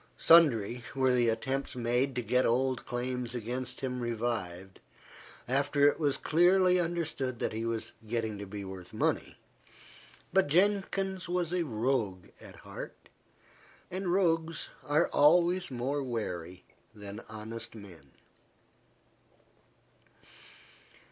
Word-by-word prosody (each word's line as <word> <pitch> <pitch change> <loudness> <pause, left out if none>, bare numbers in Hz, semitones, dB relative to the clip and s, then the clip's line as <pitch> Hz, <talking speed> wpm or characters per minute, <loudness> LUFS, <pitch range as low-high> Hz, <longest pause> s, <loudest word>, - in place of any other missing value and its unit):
Sundry 125 -8 +5
were 130 -1 +3
the 120 -2 +3
attempts 130 +5 -2
made 125 +2 0
to 125 - -1
get 125 +3 +2
old 130 +2 +1
claims 125 0 -3
against 125 +2 -4
him 125 -1 -3
revived, 110 -6 -3 0.7
after 140 +2 +3
it 145 - +2
was 145 -3 +2
clearly 180 +2 +4
understood 160 -7 -2
that - - -2
he 110 +1 -3
was 115 -1 -3
getting 110 -2 -2
to 100 - -6
be 100 0 -6
worth 95 -2 -9
money; - - -1 1.0
but 190 -4 +4
Jenkins 190 +2 +1
was 175 -1 -1
a 180 - +1
rogue 115 - -1
at - - -11
heart, - - -9 0.8
and 185 0 -2
rogues 165 -3 +1
are 145 +1 +2
always 175 +4 +4
more 135 +3 -2
wary 90 -8 -5 0.3
than 105 0 -8
honest 110 +2 -7
men. 90 -10 -12
125 Hz, 115 wpm, -30 LUFS, 115-160 Hz, 1.0 s, Sundry